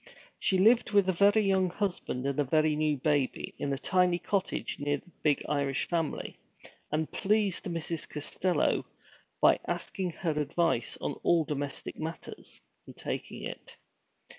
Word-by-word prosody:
She 190 - +2
lived 225 +6 +5
with 200 -2 +5
a 185 - +3
very 205 +4 +5
young 190 -1 +3
husband, 180 -9 -2
and 140 +1 -1
a - - +4
very 155 +2 +2
new 150 -1 +1
baby, 145 -1 0
in 140 - -1
a 135 - 0
tiny 180 +3 +2
cottage 195 +1 -2
near 145 0 0
the 175 - -18
big 150 -2 +2
Irish 140 -2 0
family, 165 -3 -2 0.5
and 155 +1 -1
pleased 205 -1 +1
Mrs. 170 -2 -3
Costello 165 +5 0 0.6
by - - +6
asking 190 -3 -2
her 165 -1 -1
advice 150 -4 0
on - - -1
all 170 -2 +3
domestic 145 -1 -4
matters, 160 +1 -7 0.3
and - - -12
taking - - -5
it. - - -8
165 Hz, 150 wpm, -30 LUFS, 145-185 Hz, 0.6 s, by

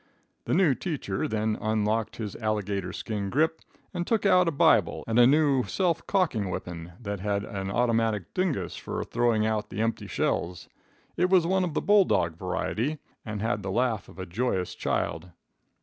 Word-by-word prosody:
The - - +1
new 175 -6 +4
teacher 130 - -3
then 110 0 -1
unlocked 110 0 0
his 105 -3 -5
alligator 100 -4 -2
skin 100 0 -4
grip, 160 +6 +1 0.3
and 175 -1 -3
took 220 -3 +1
out 180 -2 +5
a - - +2
Bible 140 - +3
and 115 +1 +1
a 120 - +8
new 145 -2 +4
self 175 -4 0
cocking 145 - +1
weepon 90 -2 -6
that 100 -3 -4
had 100 +1 -1
an 95 -2 -5
automatic 115 -3 0
dingus 145 - -1
for - - -4
throwing 115 -3 +1
out 110 -1 -1
the 95 - -6
empty 115 0 -2
shells. 90 0 -2 0.5
It 180 +2 +2
was 185 -3 +5
one 190 +2 +2
of 170 -4 -3
the - - +1
bull 205 -2 +5
dog 85 - +1
variety, 110 - -2 0.3
and 110 -2 -4
had 115 -2 0
the 95 - -4
laugh 115 -1 0
of - - -15
a 95 - -5
joyous 95 -1 -1
child. 85 +3 -2
110 Hz, 180 wpm, -27 LUFS, 100-150 Hz, 0.5 s, a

